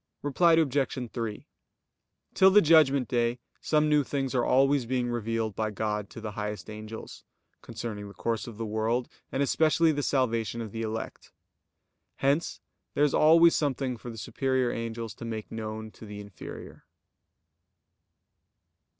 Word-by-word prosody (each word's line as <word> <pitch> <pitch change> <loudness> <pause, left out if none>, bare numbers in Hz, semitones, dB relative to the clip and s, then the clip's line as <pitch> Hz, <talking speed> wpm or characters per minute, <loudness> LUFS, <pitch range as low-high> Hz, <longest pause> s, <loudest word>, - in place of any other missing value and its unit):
Reply 165 +4 +4
Obj. 135 -5 +1
3: 115 -3 -4 0.9
Till 190 - +6
the 200 +2 +7
Judgment 150 - +5
Day 120 0 +1 0.2
some 155 -1 +2
new 150 -1 +4
things 135 -1 -2
are 125 -2 +2
always 135 -1 +3
being 125 -1 0
revealed 115 -2 -2
by 110 +1 -1
God 105 0 -3
to - - -9
the 110 -1 -5
highest 105 0 -5
angels, 110 +1 -9 0.4
concerning 110 -3 -6
the 100 - -12
course 115 -1 -2
of 115 -3 -9
the 115 - -3
world, 110 +3 -1 0.2
and 135 - +1
especially 160 +3 +3
the 145 -1 -1
salvation 115 -6 0
of 110 -3 -5
the 115 - -5
elect. 110 0 -5 0.8
Hence 140 +5 0 0.4
there 145 - +3
is 150 - +3
always 165 +2 +6
something 135 -3 -1
for 120 +1 -9
the 115 - -8
superior 130 +2 0
angels 115 -1 -4
to - - -11
make 110 -2 -5
known 110 0 -5
to 110 - -12
the 105 0 -8
inferior. 100 -2 -10
120 Hz, 150 wpm, -28 LUFS, 110-140 Hz, 0.9 s, the